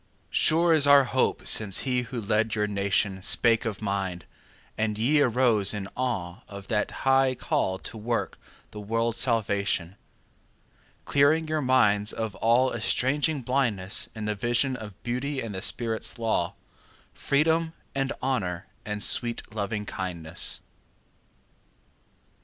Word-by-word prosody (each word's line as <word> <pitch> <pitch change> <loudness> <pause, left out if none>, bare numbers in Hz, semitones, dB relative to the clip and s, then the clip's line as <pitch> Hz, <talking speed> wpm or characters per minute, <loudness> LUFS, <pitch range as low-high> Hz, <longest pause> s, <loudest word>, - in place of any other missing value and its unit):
Sure 165 +1 +4
is 150 -3 +4
our 140 -1 +7
hope 130 0 0
since 100 -4 +2
he 125 -2 0
who 125 0 -6
led 110 +1 0
your 105 -1 0
nationSpake 100 +3 +1
for 105 +1 -11
mankind, 95 -3 -3 0.5
and 110 -1 -1
ye 145 +7 +3
arose 115 -6 +2
in 100 -2 -5
aweOf 100 -4 -4
that 105 -2 -1 0.2
high 135 -1 +3
call 95 -5 -1
to 110 - -8
work 115 +2 -3 0.3
the 105 - -8
world's 115 +2 -1
salvation; 100 -6 0 1.1
Clearing 155 +3 +3
your 155 0 -1
minds 105 -6 +3
of 110 -2 -3
all 120 +3 +3
estranging 135 +5 0
blindnessIn 110 -4 0
the 105 - 0
vision 120 +5 0
of 105 -5 -9
Beauty 130 +4 -2
and 115 -4 -5
the 95 - -5
Spirit's 115 +1 -1
law, 110 -7 -1 0.6
Freedom 160 +3 +1 0.2
and 135 0 -1
Honour 100 -9 -2 0.2
and 105 -1 -3
sweet 120 -1 +2
Lovingkindness. 95 -6 -1
115 Hz, 125 wpm, -26 LUFS, 100-130 Hz, 1.1 s, our